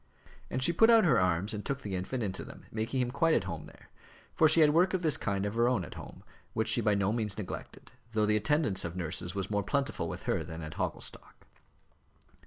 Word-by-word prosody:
And 130 Hz, -, -1 dB
she 170 Hz, -, +5 dB
put 225 Hz, +7 st, +5 dB
out 225 Hz, -4 st, +6 dB
her 130 Hz, -8 st, +4 dB
arms 90 Hz, +3 st, +1 dB
and 105 Hz, -1 st, -4 dB
took 140 Hz, 0 st, -4 dB
the 100 Hz, -, -5 dB
infant 110 Hz, +7 st, -3 dB
into 95 Hz, -2 st, -3 dB
them, -, -, -12 dB
making 115 Hz, +4 st, -1 dB
him 125 Hz, -1 st, -1 dB
quite 160 Hz, +4 st, +2 dB
at -, -, +1 dB
home 85 Hz, -4 st, -6 dB
there; -, -, -18 dB, 0.4 s
for 155 Hz, -, +5 dB
she 160 Hz, +2 st, +6 dB
had 150 Hz, -1 st, +6 dB
work 180 Hz, +3 st, +3 dB
of 180 Hz, -, -2 dB
this 155 Hz, -4 st, +4 dB
kind 100 Hz, -1 st, -1 dB
of 100 Hz, -, -2 dB
her 120 Hz, +1 st, +3 dB
own, 125 Hz, -, 0 dB
at -, -, -10 dB
home, -, -, -11 dB, 0.3 s
which -, -, 0 dB
she -, -, +3 dB
by 105 Hz, -1 st, +2 dB
no 100 Hz, +1 st, +1 dB
means 110 Hz, -4 st, -2 dB
neglected, 105 Hz, -4 st, -8 dB, 0.2 s
though 110 Hz, -1 st, +2 dB
the 105 Hz, 0 st, +2 dB
attendance 105 Hz, -1 st, +1 dB
of 85 Hz, 0 st, -5 dB
nurses 90 Hz, +1 st, -4 dB
was 95 Hz, 0 st, -3 dB
more 105 Hz, -1 st, +1 dB
plentiful 140 Hz, +7 st, -2 dB
with -, -, -7 dB
her -, -, 0 dB
than 80 Hz, 0 st, -7 dB
at 75 Hz, 0 st, -7 dB
Hogglestock. -, -, -5 dB
110 Hz, 235 wpm, -30 LUFS, 95-140 Hz, 0.4 s, out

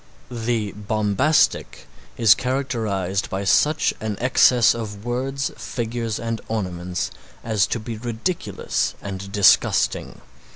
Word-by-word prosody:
The 115 Hz, -3 st, -2 dB
bombastic 105 Hz, +8 st, +1 dB, 0.3 s
is 115 Hz, -2 st, +7 dB
characterized 110 Hz, -8 st, -2 dB
by 95 Hz, +1 st, -3 dB
such 150 Hz, +10 st, +3 dB
an 110 Hz, -2 st, -3 dB
excess 125 Hz, -1 st, +5 dB
of 105 Hz, -2 st, -7 dB
words, 135 Hz, +3 st, -2 dB
figures 115 Hz, -2 st, -3 dB
and 115 Hz, -1 st, -3 dB
ornaments 90 Hz, -5 st, -3 dB, 0.3 s
as 110 Hz, -4 st, +1 dB
to 120 Hz, -, -2 dB
be 110 Hz, 0 st, -6 dB
ridiculous 120 Hz, -, -2 dB
and 100 Hz, 0 st, -7 dB
disgusting. 100 Hz, -2 st, +3 dB
110 Hz, 110 wpm, -22 LUFS, 100-120 Hz, 0.3 s, is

